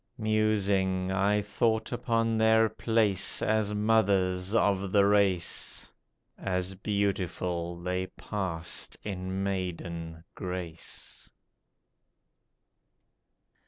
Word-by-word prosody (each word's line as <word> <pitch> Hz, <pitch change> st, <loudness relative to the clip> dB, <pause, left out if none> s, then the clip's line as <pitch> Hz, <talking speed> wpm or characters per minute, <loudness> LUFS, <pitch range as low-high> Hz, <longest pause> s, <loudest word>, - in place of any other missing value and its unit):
Musing 100 Hz, -4 st, +1 dB
I 100 Hz, +2 st, +2 dB
thought 110 Hz, +2 st, 0 dB
upon 115 Hz, -2 st, 0 dB
their 110 Hz, 0 st, +4 dB
place 110 Hz, -5 st, +1 dB
as 110 Hz, -1 st, +1 dB
mothers 100 Hz, -3 st, +2 dB
of 100 Hz, -3 st, +2 dB
the 100 Hz, -1 st, +5 dB
race, 100 Hz, -4 st, +1 dB, 0.5 s
As 90 Hz, 0 st, -2 dB
beautiful 90 Hz, -4 st, -2 dB
they 90 Hz, +1 st, -2 dB
passed 90 Hz, -6 st, -3 dB
in 95 Hz, -1 st, -3 dB
maiden 85 Hz, -4 st, -4 dB
grace. 90 Hz, -3 st, -7 dB
95 Hz, 80 wpm, -29 LUFS, 90-105 Hz, 0.5 s, the